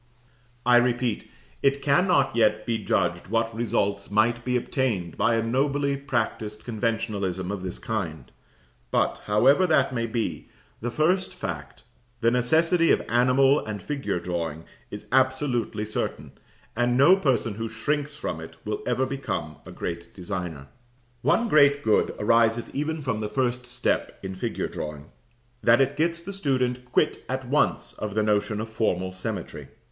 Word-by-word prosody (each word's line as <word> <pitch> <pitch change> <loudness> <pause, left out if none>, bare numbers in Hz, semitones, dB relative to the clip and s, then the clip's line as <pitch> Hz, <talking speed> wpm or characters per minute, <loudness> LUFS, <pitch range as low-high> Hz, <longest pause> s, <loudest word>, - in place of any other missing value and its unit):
] 125 - -35 0.2
I 125 -1 +6
repeat, 120 -1 0 0.3
it 140 0 +2
cannot 140 -3 +3
yet 110 -2 +2
be 115 -1 -1
judged 90 -1 0
what 115 +2 0
results 100 -3 -1
might 115 +3 +2
be 125 0 +1
obtained 115 - -1
by 115 - +2
a 115 - +1
nobly 140 +4 +1
practised 110 -5 -3
conventionalism 105 -5 -2
of 100 -2 -4
this 90 -1 -5
kind; 80 - -4 0.6
but, - - 0
however 135 - +4
that 140 -5 +3
may 115 -1 -1
be, 110 -9 -3 0.3
the 120 - -3
first 180 +8 +1
fact, - - -6 0.4
the 115 0 +3
necessity 160 +8 +3
of - - +3
animal 130 +4 +4
and 105 -1 -5
figure 140 -5 -3
drawing, 85 -3 -3 0.3
is 105 - -8
absolutely 130 -4 +1
certain, 105 - -4 0.4
and 120 +1 +2
no 145 +8 +7
person 130 - +1
who 115 +2 -4
shrinks 145 +7 -2
from 85 - -4
it 80 - -10
will 105 0 -3
ever 125 +1 +1
become 130 - -4
a - - -8
great 85 0 -5
designer. 90 -6 -5 0.6
One 235 - +2
great 145 -5 +5
good 110 - +2
arises 115 +2 +2
even 150 +2 -2
from 125 -5 -1
the 105 -1 -3
first 125 0 -1
step 120 - -1
in 95 0 -4
figure 95 - -3
drawing, 75 0 -7 0.5
that 115 +1 +5
it 135 +1 +2
gets 170 +2 0
the 195 +4 -7
student 130 -8 -1
quit - - +1
at 130 -1 -3
once 145 +4 +1
of 105 -1 -5
the 110 - +2
notion 105 0 +1
of 110 - -3
formal 95 -5 -1
symmetry. 95 0 -5
115 Hz, 155 wpm, -25 LUFS, 105-135 Hz, 0.6 s, no